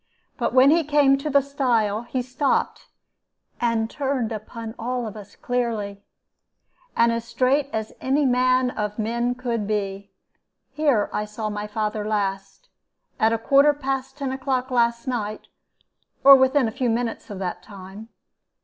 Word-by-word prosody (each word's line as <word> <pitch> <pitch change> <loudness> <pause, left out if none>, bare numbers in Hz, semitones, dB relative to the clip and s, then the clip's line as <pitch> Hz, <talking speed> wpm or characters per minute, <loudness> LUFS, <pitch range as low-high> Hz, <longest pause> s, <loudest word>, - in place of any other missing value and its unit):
But - - -1
when 260 +2 +7
he 330 +1 +4
came 290 -2 +4
to 300 +2 -3
that 280 -1 +4
stile 235 -7 0
he 250 +1 -3
stopped 260 +3 -1 0.7
and 230 -2 +1
turned 265 -3 -2
upon 220 +1 -7
all 245 +1 -2
of 215 - -7
us 205 -1 -11
clearly, 225 -5 -2 1.0
and 235 0 +4
as 230 0 -2
straight 265 +4 +1
as 220 -1 -4
any 275 +3 +1
man 255 0 +2
of 210 -2 -4
men 235 +2 -1
could 235 -4 -3
be. 200 -2 -3 0.6
'Here 285 -9 +2
I 210 - -1
saw 215 0 -5
my 210 0 -4
father 210 0 -2
last, 200 - -3 0.5
at 220 +1 +4
a 230 - +1
quarter 275 +6 +4
past 270 -1 -3
ten 275 -2 -3
o'clock 265 -1 -2
last 235 -1 +1
night, 215 -4 -4 0.7
or 275 0 +11
within 260 -1 +3
a - - -3
few 250 +1 -1
minutes 230 0 -2
of 205 - -6
that 180 -2 -4
time.' 200 +2 -11
235 Hz, 155 wpm, -23 LUFS, 215-265 Hz, 1.0 s, or